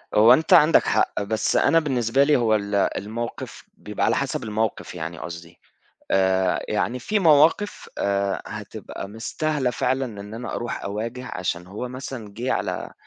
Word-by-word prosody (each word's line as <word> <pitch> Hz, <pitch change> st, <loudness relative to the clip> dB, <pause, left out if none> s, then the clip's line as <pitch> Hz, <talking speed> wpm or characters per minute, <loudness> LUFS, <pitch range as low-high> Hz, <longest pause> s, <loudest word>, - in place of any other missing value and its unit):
هو 110 Hz, +2 st, +8 dB
أنت 160 Hz, +1 st, +3 dB
عندك 150 Hz, +2 st, +7 dB
حق، -, -, +1 dB
بس 110 Hz, +2 st, -1 dB
أنا 165 Hz, -, +4 dB
بالنسبة 135 Hz, -3 st, +1 dB
لي 150 Hz, +1 st, +4 dB
هو 115 Hz, -3 st, +3 dB
ال 100 Hz, -1 st, -2 dB
الموقف 110 Hz, +4 st, -3 dB
بيبقى -, -, -2 dB
على -, -, +2 dB
حسب -, -, -2 dB
الموقف 110 Hz, -2 st, -2 dB
يعني 85 Hz, 0 st, -5 dB
قصدي، 85 Hz, +1 st, -9 dB, 0.5 s
آآ 95 Hz, -1 st, +2 dB
يعني 120 Hz, +4 st, -1 dB
في 215 Hz, -, 0 dB
مواقف 165 Hz, +4 st, +3 dB
آآ 100 Hz, -1 st, 0 dB
هتبقى -, -, -7 dB
مستاهلة 130 Hz, +5 st, -2 dB
فعلًا 130 Hz, +2 st, 0 dB
إن 105 Hz, -3 st, -8 dB
أنا 120 Hz, +2 st, -5 dB
أروح 120 Hz, -, -4 dB
أواجه 115 Hz, +5 st, -4 dB
عشان 90 Hz, -1 st, -3 dB
هو 105 Hz, +6 st, -5 dB
مثلًا 125 Hz, -4 st, -7 dB
جه 125 Hz, +2 st, -1 dB
على -, -, -3 dB
115 Hz, 155 wpm, -23 LUFS, 100-130 Hz, 0.5 s, هو